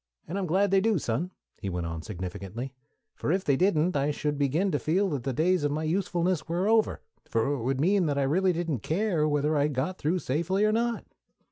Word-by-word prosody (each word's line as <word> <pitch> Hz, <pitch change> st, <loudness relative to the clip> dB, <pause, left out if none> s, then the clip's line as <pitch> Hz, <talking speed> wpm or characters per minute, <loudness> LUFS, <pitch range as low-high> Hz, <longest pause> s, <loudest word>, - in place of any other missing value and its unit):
And 185 Hz, +5 st, -3 dB
I'm 190 Hz, -, -2 dB
glad 190 Hz, +4 st, +2 dB
they 195 Hz, -1 st, +4 dB
do, 220 Hz, -1 st, +2 dB
Son," 140 Hz, +5 st, -1 dB, 0.3 s
he 100 Hz, -, -4 dB
went 90 Hz, -2 st, -3 dB
on 80 Hz, -1 st, -4 dB
significantly; 100 Hz, +7 st, -6 dB, 0.4 s
"for -, -, -2 dB
if 185 Hz, +2 st, 0 dB
they 140 Hz, -, +3 dB
didn't, 180 Hz, 0 st, +2 dB
I 140 Hz, +1 st, +1 dB
should 150 Hz, 0 st, -1 dB
begin 155 Hz, +8 st, +1 dB
to 145 Hz, -, 0 dB
feel 185 Hz, +6 st, +1 dB
that 145 Hz, -6 st, -2 dB
the 135 Hz, -, -2 dB
days 170 Hz, +5 st, +2 dB
of 145 Hz, -, +1 dB
my 155 Hz, +2 st, -2 dB
usefulness 175 Hz, 0 st, 0 dB
were 175 Hz, +4 st, 0 dB
over, 220 Hz, 0 st, +2 dB, 0.3 s
for 115 Hz, +5 st, +1 dB
it 140 Hz, -, -3 dB
would 130 Hz, +3 st, -1 dB
mean 185 Hz, +3 st, +3 dB
that 145 Hz, -1 st, 0 dB
I 140 Hz, -, +2 dB
really 180 Hz, +7 st, +2 dB
didn't 165 Hz, -6 st, -2 dB
care 165 Hz, -, 0 dB
whether 150 Hz, +1 st, +1 dB
I 145 Hz, 0 st, +3 dB
got 150 Hz, +6 st, -2 dB
through 160 Hz, +5 st, +1 dB
safely 175 Hz, +7 st, 0 dB
or 215 Hz, -, +3 dB
not." 235 Hz, +1 st, 0 dB
155 Hz, 225 wpm, -28 LUFS, 140-185 Hz, 0.4 s, they